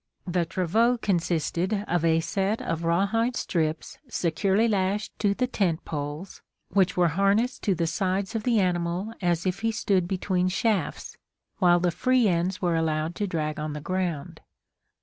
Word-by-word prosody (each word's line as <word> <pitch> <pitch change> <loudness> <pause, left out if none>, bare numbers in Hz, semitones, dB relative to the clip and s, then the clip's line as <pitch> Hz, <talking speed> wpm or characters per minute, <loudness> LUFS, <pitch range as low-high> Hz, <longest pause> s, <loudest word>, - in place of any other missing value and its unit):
The 175 -1 0
travaux 215 +8 +2
consisted 185 +1 0
of 175 -1 0
a 165 0 +3
set 195 +5 -1
of 165 0 -3
rawhide 200 +8 +1
strips 160 -6 -2
securely 195 +3 +1
lashed 205 0 0
to 200 -2 +2
the 250 - +1
tent 190 -10 -1
poles, 150 +4 -5 0.3
which 185 -1 +2
were 175 -1 +4
harnessed 200 - +1
to 200 -4 +2
the 170 - 0
sides 190 +4 -1
of 225 - -1
the 230 -1 +2
animal 180 +3 -1
as 175 -1 0
if 185 +1 -1
he 225 0 0
stood 195 -5 +1
between 185 -1 0
shafts, 190 -3 -1 0.4
while 175 -1 +5
the 175 0 +1
free 255 +5 +2
ends 180 +1 0
were 175 -2 +2
allowed 160 0 0
to 205 - -1
drag 155 -4 -2
on 150 0 -3
the 150 - -5
ground. 175 -3 -3
185 Hz, 165 wpm, -26 LUFS, 170-205 Hz, 0.4 s, while